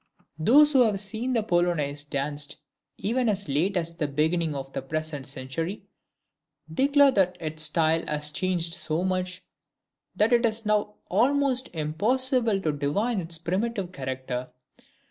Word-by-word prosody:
Those 285 - +6
who 265 - +6
have 215 -5 +2
seen 220 +6 -1
the 225 -3 +1
Polonaise 170 -7 0
danced 145 +1 -3 0.4
even 235 +4 0
as 200 -2 0
late 165 +8 0
as 170 -1 -2
the 155 -3 -1
beginning 155 +2 0
of 135 0 -6
the - - -3
present 150 0 -4
century, 140 +8 -4 0.9
declare 280 - +5
that 185 -5 +1
its 155 -1 -3
style 160 +1 +2
has 150 0 -1
changed 170 0 -1
so 170 -1 -1
much, 185 -1 -2 0.7
that 215 +4 +3
it 240 0 +4
is 225 -1 0
now 210 0 +1
almost 270 0 +2
impossible 220 - +1
to 155 - 0
divine 185 +10 -1
its 165 0 -3
primitive 185 +3 -2
character. 130 -4 -4
175 Hz, 145 wpm, -26 LUFS, 150-220 Hz, 0.9 s, Those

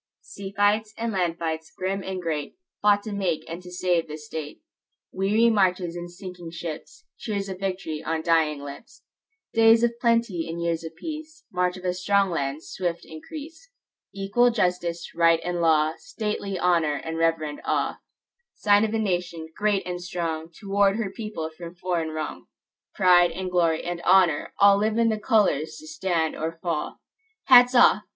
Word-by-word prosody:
Sea 195 -1 -9
fights 210 +1 +2
and 230 0 -2
land 175 -3 0
fights, 160 -1 -4
grim 195 +1 -2
and 190 -1 -4
great, 155 -4 -3 0.3
Fought 205 -1 +4
to 215 - -6
make 190 -6 -2
and 165 +2 -6
to 180 - -11
save 180 -2 0
the 155 0 -6
State:Weary 195 - -2
marches 185 -4 +1
and 175 0 -6
sinking 175 -1 -9
ships; 170 - -8
Cheers 200 -3 -3
of 185 -1 -6
victory 185 -5 -3
on 160 0 -2
dying 160 -3 +2
lips; 140 -1 -11 0.5
Days 225 +1 +6
of 235 0 +1
plenty 230 -9 +1
and 165 +1 -4
years 170 -1 -1
of 165 - -8
peace; 315 0 -8
March 180 0 0
of 185 - -10
a 180 - +1
strong 195 +1 +2
land's 140 -1 -3
swift 175 -2 -3
increase; 315 - -10 0.4
Equal 200 +5 +2
justice, 180 -6 -1
right 165 -1 +4
and 175 0 -2
law, 155 -1 +3
Stately 210 -4 -4
honor 170 -4 +2
and 160 +2 -5
reverend 165 -3 0
awe; - - -1 0.6
Sign 205 -1 +4
of 220 0 0
a - - +2
nation, 175 -5 -2
great 205 -1 +1
and 180 -1 -4
strongTo 170 -1 -5
ward 200 0 +3
her 215 -4 -2
people 205 -7 -5
from 170 +1 -9
foreign 175 -2 -2
wrong:Pride 175 +3 0
and 185 +2 -5
glory 165 -3 +2
and 175 0 -4
honor,—allLive 200 +4 +4
in 230 -1 +3
the 215 -1 -1
colors 160 - +1
to 155 - -12
stand 160 0 -1
or 165 +1 -4
fall. 165 -4 -3 0.4
Hats 250 -1 +7
off! 245 - +6
180 Hz, 160 wpm, -25 LUFS, 165-205 Hz, 0.6 s, Hats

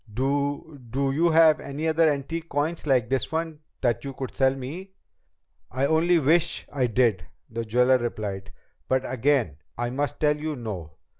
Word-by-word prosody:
"Do 140 +4 -2
do 135 +3 0
you 165 +5 +2
have 160 -1 +6
any 145 +3 -4
other 160 0 +4
antique 160 +4 -4
coins 155 +3 -2
like 125 -5 +3
this 130 +2 -1
one 160 -1 -3 0.2
that 120 -3 +1
you 135 -1 -6
could 130 -1 -6
sell 135 0 +3
me?" 165 +9 -7 0.8
"I 130 +3 0
only 165 +4 +3
wish 165 +3 +2
I 130 -3 +1
did," 110 -8 +1 0.2
the 115 0 -3
jeweler 125 +3 +3
replied. 100 -5 -4 0.4
"But 130 0 +1
again 130 - +1 0.2
I 120 0 -2
must 140 0 -2
tell 150 -1 +2
you 155 0 -3
no. 100 - -6
135 Hz, 165 wpm, -25 LUFS, 120-155 Hz, 0.8 s, have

